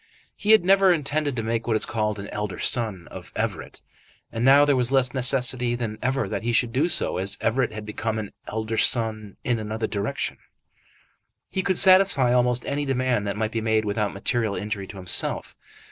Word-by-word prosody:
He 205 Hz, -, -5 dB
had 220 Hz, -5 st, +6 dB
never 195 Hz, 0 st, +5 dB
intended 150 Hz, -3 st, -1 dB
to 115 Hz, -, -3 dB
make 115 Hz, +1 st, -2 dB
what 115 Hz, -, +1 dB
is 110 Hz, -, +1 dB
called 105 Hz, -2 st, -2 dB
an 100 Hz, 0 st, -7 dB
elder 105 Hz, -3 st, -5 dB
son 110 Hz, -8 st, -1 dB
of -, -, -11 dB
Everett, -, -, -4 dB, 0.5 s
and 115 Hz, -, -3 dB
now 140 Hz, +3 st, +6 dB
there 145 Hz, -1 st, +2 dB
was 125 Hz, 0 st, +1 dB
less 130 Hz, -1 st, +1 dB
necessity 125 Hz, -2 st, +1 dB
than 115 Hz, -3 st, -5 dB
ever 130 Hz, -3 st, -1 dB
that -, -, -4 dB
he 120 Hz, +1 st, -2 dB
should 115 Hz, 0 st, +1 dB
do 150 Hz, +7 st, +1 dB
so, -, -, +1 dB
as 95 Hz, +2 st, 0 dB
Everett 130 Hz, +1 st, 0 dB
had 110 Hz, 0 st, -8 dB
become 110 Hz, +1 st, -4 dB
an 105 Hz, -2 st, -5 dB, 0.2 s
elder 110 Hz, +1 st, -3 dB
son 110 Hz, -4 st, 0 dB
in 120 Hz, -2 st, -1 dB
another 110 Hz, +1 st, -4 dB
direction. 100 Hz, -2 st, -3 dB, 1.1 s
He 190 Hz, -, -1 dB
could 185 Hz, -1 st, 0 dB
satisfy 185 Hz, -10 st, +6 dB
almost 125 Hz, 0 st, +1 dB
any 145 Hz, +1 st, -2 dB
demand 130 Hz, -5 st, -1 dB
that 100 Hz, -, -3 dB
might 110 Hz, 0 st, -2 dB
be 115 Hz, -, -3 dB
made 110 Hz, -1 st, 0 dB
without 105 Hz, 0 st, -1 dB
material 110 Hz, +1 st, -1 dB
injury 100 Hz, -2 st, -5 dB
to 100 Hz, -, -11 dB
himself. 90 Hz, -2 st, -2 dB
115 Hz, 195 wpm, -24 LUFS, 110-135 Hz, 1.1 s, had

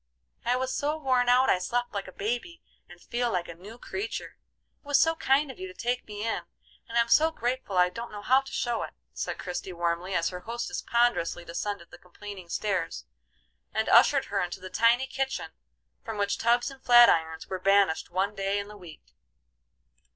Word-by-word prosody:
"I 245 Hz, +1 st, +2 dB
was 260 Hz, +1 st, -1 dB
so 300 Hz, +2 st, -1 dB
worn 255 Hz, -4 st, +2 dB
out 255 Hz, +2 st, +5 dB
I 185 Hz, -, +3 dB
slept 245 Hz, +6 st, -2 dB
like 200 Hz, -1 st, -4 dB
a -, -, -9 dB
baby, 240 Hz, -, -4 dB, 0.3 s
and -, -, -14 dB
feel 240 Hz, 0 st, -2 dB
like 180 Hz, -3 st, -1 dB
a 170 Hz, -, -7 dB
new 200 Hz, +7 st, -12 dB
creature. 390 Hz, -, -5 dB, 0.4 s
It -, -, -21 dB
was 290 Hz, -, +4 dB
so 325 Hz, -, +4 dB
kind 280 Hz, -2 st, +2 dB
of 265 Hz, -, -15 dB
you 375 Hz, -, -5 dB
to 380 Hz, -, -11 dB
take 245 Hz, -2 st, -2 dB
me 210 Hz, 0 st, -5 dB
in, 225 Hz, -, -1 dB, 0.5 s
and 230 Hz, -, -2 dB
I'm 235 Hz, 0 st, +4 dB
so 310 Hz, +7 st, +5 dB
grateful 245 Hz, -8 st, -3 dB
I 180 Hz, 0 st, +5 dB
don't 230 Hz, +6 st, -7 dB
know 205 Hz, -1 st, -8 dB
how 260 Hz, +4 st, +4 dB
to 270 Hz, -, -12 dB
show 240 Hz, -1 st, -1 dB
it," -, -, -6 dB, 0.2 s
said -, -, -4 dB
Christie, 180 Hz, +1 st, -5 dB
warmly, 170 Hz, +2 st, -1 dB
as 165 Hz, -1 st, +1 dB
her 180 Hz, -, -6 dB
hostess 235 Hz, +5 st, -4 dB
ponderously 235 Hz, -8 st, +1 dB
descended 170 Hz, +1 st, -4 dB
the 175 Hz, -, -13 dB
complaining 185 Hz, 0 st, -10 dB
stairs 205 Hz, +2 st, -2 dB, 0.7 s
and 220 Hz, 0 st, +1 dB
ushered 275 Hz, -2 st, +6 dB
her 200 Hz, -1 st, -1 dB
into 175 Hz, +1 st, -4 dB
the 185 Hz, 0 st, -9 dB
tidy 235 Hz, +6 st, +4 dB
kitchen 265 Hz, 0 st, -3 dB, 0.5 s
from 225 Hz, -2 st, -5 dB
which 200 Hz, 0 st, 0 dB
tubs 240 Hz, +3 st, +2 dB
and 270 Hz, -1 st, -14 dB
flat 240 Hz, -1 st, +8 dB
irons 160 Hz, 0 st, +1 dB
were 185 Hz, -, -4 dB
banished 195 Hz, -3 st, +3 dB
one 190 Hz, +3 st, 0 dB
day 195 Hz, 0 st, -1 dB
in 200 Hz, 0 st, -4 dB
the 210 Hz, -, -11 dB
week. 175 Hz, -5 st, -14 dB
220 Hz, 200 wpm, -28 LUFS, 185-250 Hz, 0.7 s, flat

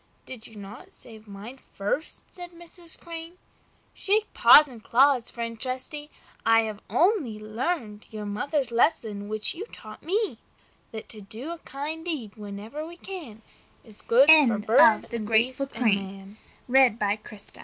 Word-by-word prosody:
"Did 245 Hz, -4 st, -10 dB
you 220 Hz, -, -16 dB
not 205 Hz, +1 st, -11 dB
save 220 Hz, -2 st, -12 dB
mine 210 Hz, +6 st, -10 dB
first?" 205 Hz, +10 st, -4 dB
said 355 Hz, -1 st, -8 dB
Mrs. 340 Hz, 0 st, -10 dB
Crane. 335 Hz, +1 st, -9 dB, 0.6 s
"Shake 425 Hz, +2 st, +1 dB
paws 300 Hz, 0 st, +8 dB
and 235 Hz, -5 st, -13 dB
claws, 260 Hz, 0 st, +3 dB
friend 230 Hz, -1 st, -6 dB
Trusty! 265 Hz, +4 st, -3 dB, 0.3 s
I 225 Hz, 0 st, +5 dB
have 215 Hz, -2 st, -5 dB
only 340 Hz, -, +1 dB
learned 215 Hz, 0 st, -4 dB
your 215 Hz, -1 st, -7 dB
mother's 260 Hz, +5 st, -2 dB
lesson, 225 Hz, -6 st, 0 dB
which 215 Hz, 0 st, +1 dB
you 405 Hz, +7 st, -7 dB
taught 215 Hz, -, -12 dB
me, 410 Hz, +6 st, -1 dB, 0.5 s
that 220 Hz, -1 st, -8 dB
"To 215 Hz, -, -7 dB
do 225 Hz, +10 st, -8 dB
a 340 Hz, -, -7 dB
kind 305 Hz, +4 st, -6 dB
deed 290 Hz, -12 st, -4 dB
wherever 210 Hz, +7 st, -7 dB
we 340 Hz, +2 st, -10 dB
can, 305 Hz, -, -9 dB, 0.4 s
Is 215 Hz, -3 st, -17 dB
good 255 Hz, +5 st, +4 dB, 0.2 s
for 225 Hz, -3 st, +1 dB
bird 220 Hz, +1 st, +4 dB
and 220 Hz, -2 st, -4 dB
beast 255 Hz, +5 st, +1 dB
and 200 Hz, -3 st, -1 dB, 0.3 s
m 245 Hz, -5 st, +4 dB
235 Hz, 145 wpm, -26 LUFS, 215-305 Hz, 0.6 s, paws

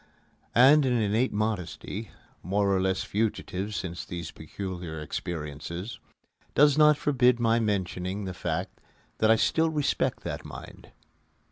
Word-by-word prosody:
And 140 Hz, +5 st, +7 dB
an 130 Hz, -2 st, +2 dB
innate 110 Hz, +4 st, +1 dB
modesty 105 Hz, 0 st, -3 dB, 0.3 s
(more 100 Hz, +2 st, +1 dB
or 95 Hz, -, +1 dB
less 95 Hz, 0 st, 0 dB
fugitive 105 Hz, -1 st, -2 dB
since 90 Hz, -2 st, -4 dB
these 85 Hz, -2 st, -6 dB
peculiar 90 Hz, -1 st, -6 dB
experiences) 85 Hz, +6 st, -5 dB, 0.6 s
does 145 Hz, -1 st, +6 dB
not 150 Hz, -1 st, +6 dB
forbid 125 Hz, -5 st, +3 dB
my 115 Hz, 0 st, +3 dB
mentioning 95 Hz, -2 st, -2 dB
the 95 Hz, -, -4 dB
fact -, -, -4 dB, 0.4 s
that 110 Hz, -, +4 dB
I 110 Hz, -, +7 dB
still 160 Hz, +8 st, +2 dB
respect 150 Hz, -2 st, 0 dB
that -, -, -4 dB
mind. -, -, -10 dB
100 Hz, 130 wpm, -28 LUFS, 90-120 Hz, 0.6 s, And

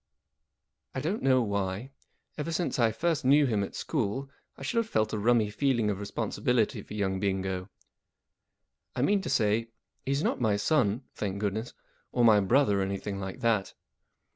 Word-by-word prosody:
I -, -, -1 dB
DON'T 170 Hz, +10 st, -2 dB
know 130 Hz, -2 st, +4 dB
why, 100 Hz, +3 st, -2 dB, 0.4 s
ever 150 Hz, +2 st, -3 dB
since 165 Hz, -4 st, -1 dB
I 115 Hz, -2 st, +4 dB
first 160 Hz, +6 st, 0 dB
knew 140 Hz, +3 st, +5 dB
him 110 Hz, -6 st, +1 dB
at -, -, -6 dB
school, 135 Hz, 0 st, -2 dB, 0.3 s
I -, -, -9 dB
should 135 Hz, -, -2 dB
have 225 Hz, -1 st, -2 dB
felt 110 Hz, 0 st, 0 dB
a 105 Hz, -, -1 dB
rummy 110 Hz, -1 st, +3 dB
feeling 120 Hz, -3 st, +1 dB
of 100 Hz, -, -4 dB
responsibility 110 Hz, +3 st, 0 dB
for 105 Hz, -, -9 dB
young 95 Hz, -2 st, -1 dB
Bingo. 95 Hz, -1 st, -2 dB, 1.3 s
I 125 Hz, -, 0 dB
mean 200 Hz, +5 st, +3 dB
to -, -, -5 dB
say, 115 Hz, -2 st, +2 dB, 0.4 s
he's 140 Hz, +2 st, 0 dB
not -, -, 0 dB
my 110 Hz, -4 st, +3 dB
son 120 Hz, -1 st, +1 dB
(thank 100 Hz, -2 st, -3 dB
goodness) 105 Hz, +3 st, -3 dB, 0.4 s
or 120 Hz, -, +3 dB
my 110 Hz, -2 st, +7 dB
brother 105 Hz, 0 st, +3 dB
or -, -, +1 dB
anything 100 Hz, +1 st, -3 dB
like 95 Hz, +5 st, -6 dB
that. 115 Hz, -5 st, +1 dB
110 Hz, 170 wpm, -29 LUFS, 100-135 Hz, 1.3 s, my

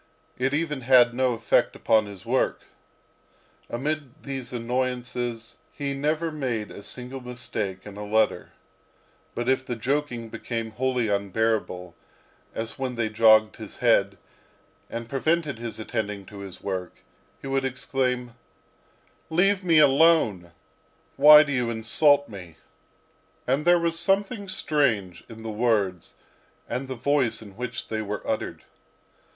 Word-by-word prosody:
It 135 Hz, +1 st, +1 dB
even 150 Hz, -3 st, -2 dB
had 120 Hz, -1 st, +5 dB
no 130 Hz, 0 st, +1 dB
effect 115 Hz, -, +1 dB
upon 110 Hz, -2 st, +2 dB
his 100 Hz, -2 st, -11 dB
work. 125 Hz, +3 st, 0 dB, 1.1 s
Amid 150 Hz, +6 st, -1 dB
all 145 Hz, -3 st, -20 dB
these 135 Hz, -3 st, -5 dB
annoyances 125 Hz, -1 st, -3 dB
he 140 Hz, -1 st, -3 dB
never 155 Hz, +4 st, -1 dB
made 125 Hz, -8 st, -3 dB
a -, -, -9 dB
single 125 Hz, +5 st, -7 dB
mistake 115 Hz, -6 st, -5 dB
in 105 Hz, -1 st, -10 dB
a 105 Hz, -, -5 dB
letter. 110 Hz, +1 st, +1 dB, 0.9 s
But 120 Hz, -, -3 dB
if 130 Hz, 0 st, +2 dB
the 125 Hz, -2 st, -4 dB
joking 125 Hz, -1 st, -2 dB
became 115 Hz, 0 st, -4 dB
wholly 125 Hz, 0 st, 0 dB
unbearable, 100 Hz, -3 st, -1 dB, 0.6 s
as 115 Hz, +2 st, -5 dB
when 130 Hz, -2 st, -2 dB
they 115 Hz, -2 st, -1 dB
jogged 110 Hz, 0 st, +5 dB
his 110 Hz, -3 st, -9 dB
head, 100 Hz, -5 st, +3 dB, 0.7 s
and 115 Hz, 0 st, -5 dB
prevented 145 Hz, 0 st, 0 dB
his 115 Hz, -1 st, -5 dB
attending 105 Hz, -2 st, -4 dB
to 100 Hz, +1 st, -11 dB
his 100 Hz, -2 st, -9 dB
work, 95 Hz, -2 st, -5 dB, 0.4 s
he -, -, -12 dB
would 135 Hz, 0 st, 0 dB
exclaim: 125 Hz, -1 st, -2 dB, 1.0 s
"Leave 190 Hz, +4 st, +2 dB
me 165 Hz, -3 st, +4 dB
alone! 140 Hz, -, +4 dB, 0.6 s
Why 150 Hz, +2 st, +9 dB
do 145 Hz, -, -5 dB
you 125 Hz, -3 st, 0 dB
insult 140 Hz, +6 st, +3 dB
me?" 90 Hz, -7 st, -11 dB, 0.9 s
And 135 Hz, +4 st, 0 dB
there 175 Hz, 0 st, +6 dB
was 170 Hz, -1 st, -1 dB
something 200 Hz, +3 st, 0 dB
strange 125 Hz, -, 0 dB
in 115 Hz, -1 st, -10 dB
the 110 Hz, -, -4 dB
words 105 Hz, -6 st, 0 dB, 0.5 s
and 125 Hz, +3 st, -3 dB
the 130 Hz, -, -4 dB
voice 125 Hz, -3 st, 0 dB
in 100 Hz, -3 st, -13 dB
which 125 Hz, 0 st, -5 dB
they 110 Hz, -1 st, -2 dB
were 105 Hz, -1 st, -5 dB
uttered. -, -, -3 dB
120 Hz, 140 wpm, -25 LUFS, 110-140 Hz, 1.1 s, Why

